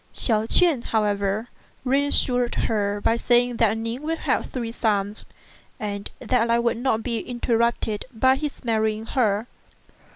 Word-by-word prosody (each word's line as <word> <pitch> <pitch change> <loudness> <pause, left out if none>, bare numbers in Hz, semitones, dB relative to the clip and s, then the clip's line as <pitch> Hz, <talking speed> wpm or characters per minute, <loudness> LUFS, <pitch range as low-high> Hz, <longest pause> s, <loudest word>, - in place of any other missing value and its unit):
Hsiao 220 -2 +1
ch'ien, 330 -6 +5
how 220 -2 0
ever, 205 +2 -1 0.4
reassured 255 -2 +3
her 205 -2 -1
by 225 - +3
saying 245 0 +2
that 225 -1 +2
Ning 230 +3 -4
would 325 +2 -2
have - - -1
three 235 -3 -5
sons, 210 -3 -1 0.5
and 200 -1 -5
that 250 - 0
the - - +2
line 235 0 +2
would 235 -1 0
not 235 -3 0
be 235 -3 -2
interrupted 235 -3 -1
by 260 +3 +3
his 290 0 -5
marrying 220 -1 0
her. 220 -4 0
230 Hz, 155 wpm, -23 LUFS, 215-245 Hz, 0.5 s, ch'ien